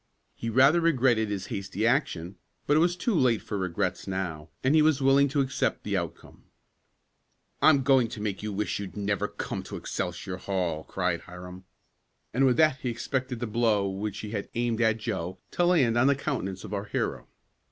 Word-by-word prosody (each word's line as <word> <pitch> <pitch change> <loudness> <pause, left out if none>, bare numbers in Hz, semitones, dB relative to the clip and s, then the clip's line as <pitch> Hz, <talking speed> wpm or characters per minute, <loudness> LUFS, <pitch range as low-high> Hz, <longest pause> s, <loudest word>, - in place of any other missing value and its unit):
He 115 - -5
rather 135 +8 +5
regretted 125 -9 +3
his 100 -2 -3
hasty 100 +1 -2
action, 100 - 0 0.3
but 145 - +3
it - - +5
was 175 +2 +3
too 220 +6 -1
late 130 - +3
for - - -6
regrets 95 -2 -2
now, 90 -5 -4
and 130 +3 +3
he 155 - +6
was 155 -2 +3
willing 135 +1 +5
to 140 +1 +1
accept 135 -1 -1
the - - -2
outcome. - - -5 1.2
"I'm 140 -4 +5
going 130 -3 +4
to 115 -1 -8
make 105 -2 -3
you 105 0 -3
wish 105 +1 -2
you'd 95 -3 -7
never 100 -1 0
come - - -5
to - - -8
Excelsior 90 - -4
Hall!" 90 -5 -2
cried 90 -2 -1
Hiram, 90 +1 -10 0.7
and 135 +3 +4
with 125 - +3
that 155 -4 +4
he 130 - -3
expected 130 +1 -3
the - - 0
blow 110 -3 +1
which 100 +1 -4
he 105 - -6
had 100 -3 -4
aimed 120 -1 0
at 110 -1 +3
Joe 95 -5 -4
to 175 - +1
land 145 -10 +3
on 130 - +4
the 140 - +4
countenance 105 -10 -3
of 105 - -7
our 100 0 -2
hero. - - -3
115 Hz, 195 wpm, -27 LUFS, 95-135 Hz, 1.2 s, he